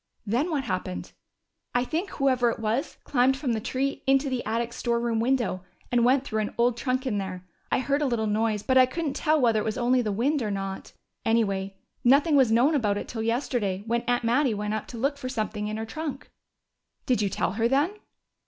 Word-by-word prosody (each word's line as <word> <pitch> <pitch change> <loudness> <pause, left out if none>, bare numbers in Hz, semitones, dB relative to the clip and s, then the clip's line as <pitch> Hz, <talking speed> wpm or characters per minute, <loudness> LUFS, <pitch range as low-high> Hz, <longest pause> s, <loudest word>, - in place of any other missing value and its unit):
"Then 245 - 0
what 295 -5 -1
happened?" 185 -4 -4 0.6
"I 245 - +3
think 330 +9 -2
whoever 255 -4 +2
it - - -2
was 225 +7 -2
climbed 265 0 +2
from 270 -4 -1
the 220 - -1
tree 270 +5 -2
into 270 +1 +3
the 250 -2 -1
attic 230 +2 -1
storeroom 235 -1 0
window 235 -6 0 0.3
and 240 -1 +3
went 260 +2 +4
through 220 -5 -2
an 210 - -4
old 240 0 +3
trunk 255 +2 -1
in 215 -6 0
there. 185 -2 -5 0.3
I - - +3
heard 280 +3 0
a 290 - +2
little 235 -3 0
noise, 215 0 0
but 260 -1 +4
I 255 - +6
couldn't 300 +1 -3
tell 310 +2 +2
whether 230 -4 +3
it - - -1
was 220 - -2
only 250 +1 +3
the 215 -3 -1
wind 265 +8 +1
or 215 - -1
not. 195 -1 -5 0.3
Anyway, 200 -4 0 0.3
nothing 285 +5 +5
was 260 -5 +5
known 245 +7 +4
about 210 -8 +1
it - - -5
till 225 - -4
yesterday, 225 -4 -1
when 235 +1 0
Aunt 245 0 +1
Mattie 240 +1 +2
went 210 +1 -2
up 215 - -3
to 240 - -8
look 275 +5 0
for 255 -2 -4
something 215 -3 -3
in 215 0 -3
her 220 - -3
trunk." 305 +5 -6 0.7
"Did 250 -4 +2
you 200 - +1
tell 175 - -1
her 225 +3 +1
then?" 280 +8 +2
240 Hz, 220 wpm, -26 LUFS, 215-265 Hz, 0.7 s, I